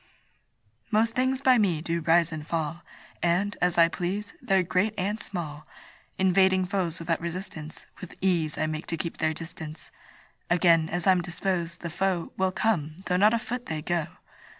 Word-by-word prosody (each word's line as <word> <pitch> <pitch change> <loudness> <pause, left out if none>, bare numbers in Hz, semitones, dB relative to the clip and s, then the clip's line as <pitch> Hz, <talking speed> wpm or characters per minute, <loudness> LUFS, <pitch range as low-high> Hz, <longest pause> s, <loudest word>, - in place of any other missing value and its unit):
Most 225 +2 +2
things 260 +1 +1
by 255 -3 +5
me 180 -7 +2
do 170 +1 -2
rise 165 +1 +3
and 155 -1 -6
fall, 165 0 -2 0.4
And, 180 +4 +1
as 180 -1 +2
I 165 -1 +7
please, 190 +4 -3
they're 190 -1 +2
great 185 +5 +1
and 205 +4 -1
small; 155 -8 -6 0.5
Invading 190 0 +4
foes 180 -3 -1
without 165 -1 -1
resistance, 170 -3 -6
With 185 - -9
ease 170 -5 +1
I 155 - +1
make 155 +1 -4
to 165 - -1
keep 165 +1 -4
their 155 0 0
distance: 160 -1 -8 0.6
Again, 165 -2 +4
as 175 0 -2
I'm 185 -2 +5
disposed, 170 -1 -2
the 170 - -5
foe 180 -1 -1
Will 190 0 +1
come, 180 -5 -1
though 180 0 +1
not 210 +4 +5
a - - +2
foot 245 +2 -5
they 155 -1 -3
go. 170 -2 0
175 Hz, 175 wpm, -27 LUFS, 165-190 Hz, 0.6 s, I